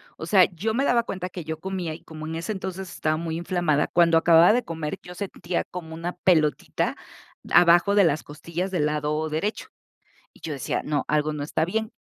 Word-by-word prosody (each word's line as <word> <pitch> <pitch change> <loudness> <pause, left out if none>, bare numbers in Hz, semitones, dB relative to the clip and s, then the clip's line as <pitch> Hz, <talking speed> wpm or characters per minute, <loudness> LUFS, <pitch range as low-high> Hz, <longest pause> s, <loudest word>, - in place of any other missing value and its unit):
O 160 - -7
sea, 185 -1 +6
yo 220 +6 -2
me 270 +4 +1
daba 235 -1 +3
cuenta 185 -4 -4
que 175 -2 -7
yo 160 0 -5
comía, 185 -3 -4
y 160 - -11
como 155 -1 -8
en 160 +1 -5
ese 170 +6 -3
entonces, 190 -1 -6
estaba 155 0 -1
muy 165 -1 -3
inflamada, 170 -4 0
cuando 170 -1 +4
acababa 170 +4 +6
de 245 - +1
comer, 160 -2 -4
yo 180 - -9
sentía 180 -2 -3
como 160 -3 -7
una 170 +2 -4
pelotita, 155 -5 +1 0.6
abajo 175 +3 +5
de 200 -3 +6
las 155 -1 +1
costillas 170 +5 -5
del 160 -5 +1
lado 150 +1 -1
derecho. 180 +8 -3 0.7
Y - - -21
yo 155 - -4
decía: 135 - -2
"No, 150 -2 -1
algo 150 0 +1
no 150 -1 -4
está 155 +2 0
bien". 220 +5 -2
170 Hz, 205 wpm, -25 LUFS, 155-185 Hz, 0.7 s, sea